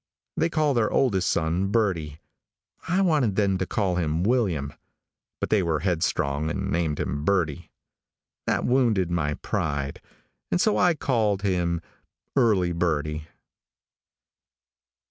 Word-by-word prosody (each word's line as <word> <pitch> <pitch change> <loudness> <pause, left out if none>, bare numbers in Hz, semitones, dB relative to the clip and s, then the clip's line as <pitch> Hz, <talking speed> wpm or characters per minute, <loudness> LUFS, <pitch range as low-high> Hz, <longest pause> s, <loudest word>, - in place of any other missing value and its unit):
They 165 - +1
call 155 -3 +1
their 115 -4 +2
oldest 100 -9 +2
son 85 +3 0
Birdie. 90 -9 0 0.7
I 185 +3 +2
wanted 150 - +2
them 95 -2 +1
to 95 - -1
call 95 -4 0
him 80 -1 0
William, 95 - 0 0.7
but - - -3
they 105 - +4
were 80 -4 0
headstrong 80 -4 0
and - - -3
named 80 -2 0
him 70 +2 -2
Birdie. 85 -5 0 0.8
That - - +1
wounded 115 -8 +2
my 75 -4 0
pride, 70 0 -3 0.5
and - - +1
so 215 +3 +3
I 180 -2 +3
called 110 -8 0
him 85 -3 0 0.5
Earlie 95 -7 +3
Birdie. 75 -2 -1
90 Hz, 125 wpm, -25 LUFS, 80-110 Hz, 0.8 s, they